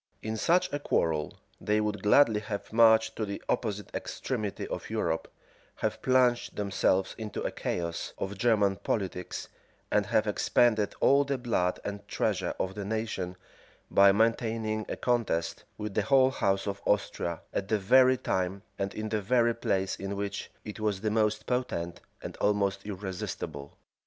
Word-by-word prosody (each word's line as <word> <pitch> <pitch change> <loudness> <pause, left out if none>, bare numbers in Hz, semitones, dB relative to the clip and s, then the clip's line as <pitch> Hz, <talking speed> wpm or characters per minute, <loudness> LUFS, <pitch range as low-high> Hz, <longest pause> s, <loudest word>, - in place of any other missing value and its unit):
In 110 0 -2
such 180 +9 +2
a 145 - 0
quarrel 80 - 0 0.2
they 105 +1 +1
would 105 -1 -1
gladly 110 +1 +5
have 105 0 -6
marched 110 -1 +5
to 110 - -1
the 100 -1 -4
opposite 105 -3 -2
extremity 110 -7 -3
of - - -5
Europe, 80 -1 -1 0.5
have - - -2
plunged 125 -2 +2
themselves 95 -2 +1
into 110 -2 -4
a - - -1
chaos 85 -1 -3
of 95 +1 -4
German 100 -2 +2
politics, 95 -4 -3 0.4
and 105 -2 +2
have 110 - +2
expended 110 0 +2
all 140 +1 +5
the 140 -1 -1
blood 115 -8 0
and 100 0 -5
treasure - - -1
of 95 - -1
the 100 0 -5
nation, 100 -4 -3 0.6
by 100 0 +7
maintaining 110 0 0
a - - -2
contest 110 -10 -1
with 105 -1 -4
the 105 - +2
whole 130 +4 +4
house 95 -6 0
of 100 -1 -4
Austria, 85 -4 0
at 95 - -2
the 110 - +2
very 130 +6 +5
time 95 -2 -2 0.2
and 100 0 -2
in 110 0 -3
the 110 -1 0
very 120 +3 +3
place 95 -4 -1
in 100 +1 -4
which 100 0 -4 0.2
it 105 0 -7
was 105 -3 -1
the 110 0 0
most 110 0 +1
potent, 105 -9 -2 0.2
and - - -6
almost 100 -1 0
irresistible. 95 -7 -5
105 Hz, 160 wpm, -29 LUFS, 95-115 Hz, 0.6 s, by